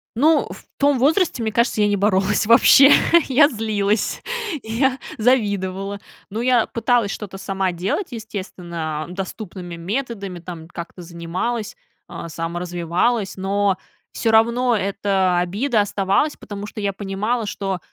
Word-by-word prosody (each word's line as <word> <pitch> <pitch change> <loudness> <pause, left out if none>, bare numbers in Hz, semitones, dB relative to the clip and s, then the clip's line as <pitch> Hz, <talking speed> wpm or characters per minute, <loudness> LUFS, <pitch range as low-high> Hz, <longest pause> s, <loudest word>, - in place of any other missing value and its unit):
Ну, 305 +6 +3
в - - -11
том 285 -1 +3
возрасте, 300 - +2
мне 220 - -1
кажется, 235 -1 +1
я 205 - +4
не 205 - +2
боролась 200 0 +2
вообще, 270 +4 +7 0.4
я 285 +2 +6
злилась, 210 -2 -1 0.4
я 255 +4 +1 0.2
завидовала, 200 -4 0 0.3
ну, 220 - -3
я 245 -2 +3
пыталась 230 -3 +1
что-то 195 -2 -7
сама 190 -1 -1
делать, 185 - -2
естественно, 175 -8 -5
а, - - -10
доступными 185 -1 -7
методами, 200 0 -4
там, 165 -2 -9
как-то 175 +1 -8
занималась, 180 +7 -4 0.3
а, 170 - -7
саморазвивалась, 175 +6 -1
но 195 0 +1 0.3
всё 225 - 0
равно 235 +2 +3
эта 195 -2 +1
обида 210 +6 +1
оставалась, 200 +8 +1
потому 205 -1 -8
что 210 0 -7
я 200 -1 -1
понимала, 210 +4 -2
что, 195 -2 -3
205 Hz, 135 wpm, -21 LUFS, 185-230 Hz, 0.4 s, вообще